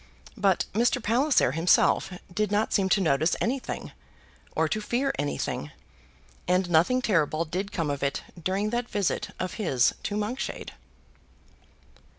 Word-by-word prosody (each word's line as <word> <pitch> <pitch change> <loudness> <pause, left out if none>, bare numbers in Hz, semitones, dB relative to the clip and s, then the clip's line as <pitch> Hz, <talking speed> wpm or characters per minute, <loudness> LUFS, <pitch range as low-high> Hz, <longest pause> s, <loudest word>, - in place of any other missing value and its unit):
But 195 -5 +2
Mr. 235 +4 +3
Palliser 245 - +3
himself 165 +4 +3 0.2
did 210 +1 0
not 210 +1 +1
seem 195 -2 +2
to 200 - +4
notice 155 0 +2
anything, 255 +3 -3 0.6
or - - +2
to 215 - -2
fear 255 +6 0
anything; 145 - -2 0.8
and 180 +1 +2
nothing 180 +11 +3
terrible 165 -5 +1
did 185 +6 -3
come 165 -5 -1
of 140 - -4
it 140 0 -1 0.2
during 195 +5 -1
that 240 0 -2
visit 200 -4 -1
of 185 - -3
his 135 - +3
to 205 - -3
Monkshade. 215 +5 -3
195 Hz, 140 wpm, -27 LUFS, 165-220 Hz, 0.8 s, to